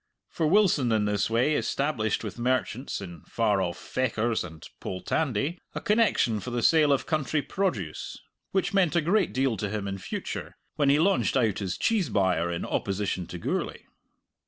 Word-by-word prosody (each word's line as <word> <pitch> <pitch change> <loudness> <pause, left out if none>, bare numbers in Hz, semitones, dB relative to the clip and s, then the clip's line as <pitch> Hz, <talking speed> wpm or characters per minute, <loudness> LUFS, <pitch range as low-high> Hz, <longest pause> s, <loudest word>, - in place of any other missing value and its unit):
For 160 - 0
Wilson 160 - +4
in 110 -2 +2
this 105 0 0
way 120 +7 +2
established 135 -8 0
with 105 +2 -6
merchants, 125 -1 -1
in 85 -5 -8
far 105 -4 +1
off 85 -2 -2
Fechars 115 -3 -1
and 80 -3 -10
Poltandie, 140 - -1 0.2
a - - -1
connection 210 - +2
for 125 - -6
the 120 -1 -2
sale 155 -3 +5
of 140 - +2
country 155 -1 0
produce 120 - -2 0.3
which 190 +1 0
meant 185 -4 +3
a 170 - +4
great 185 +4 +2
deal 130 -4 +1
to 100 +1 -2
him 105 -1 -3
in 95 0 -4
future, 95 - -5 0.2
when 145 -2 +2
he 140 - +5
launched 185 -2 +2
out 110 -5 +1
as 95 -2 -2
cheese 210 - +1
buyer 90 -4 +1
in 85 - -3
opposition 95 -3 -2
to 90 - -7
Gourlay. - - -3
120 Hz, 175 wpm, -27 LUFS, 100-155 Hz, 0.3 s, sale